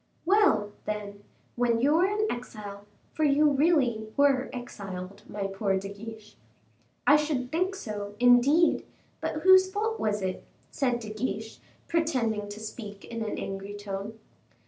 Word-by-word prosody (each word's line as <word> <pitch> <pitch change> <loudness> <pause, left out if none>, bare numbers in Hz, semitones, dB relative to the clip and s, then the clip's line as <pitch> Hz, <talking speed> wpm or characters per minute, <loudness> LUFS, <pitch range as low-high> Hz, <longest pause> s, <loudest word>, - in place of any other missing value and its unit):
"Well, 340 - +4
then; 205 -1 -5 0.3
when 235 -1 +2
you 280 +5 +3
were 345 +4 +4
in 420 +1 0
exile 205 - -6 0.3
for 310 - -1
you 295 +1 +5
really 270 -8 +2
were 275 -2 +3
exiled, 195 -6 -7
my 200 -1 -3
poor 195 0 0
De 195 +1 -5
Guiche 215 +1 -10 0.3
" - - -37 0.3
"I 290 - +7
should 295 -4 0
think 370 +4 0
so, 205 - -6
indeed; 245 +7 +5 0.4
but 310 - -3
whose 375 0 +7
fault 445 +3 -1
was 210 -2 0
it?" 185 -1 -3 0.3
said 250 -4 0
De 215 -1 -6
Guiche, 220 -1 -4 0.3
pretending 240 -11 0
to 205 +1 -7
speak 210 -2 -8
in 230 -1 -4
an 215 - -3
angry 195 +1 -5
tone. 205 +1 -6
230 Hz, 150 wpm, -28 LUFS, 205-295 Hz, 0.4 s, I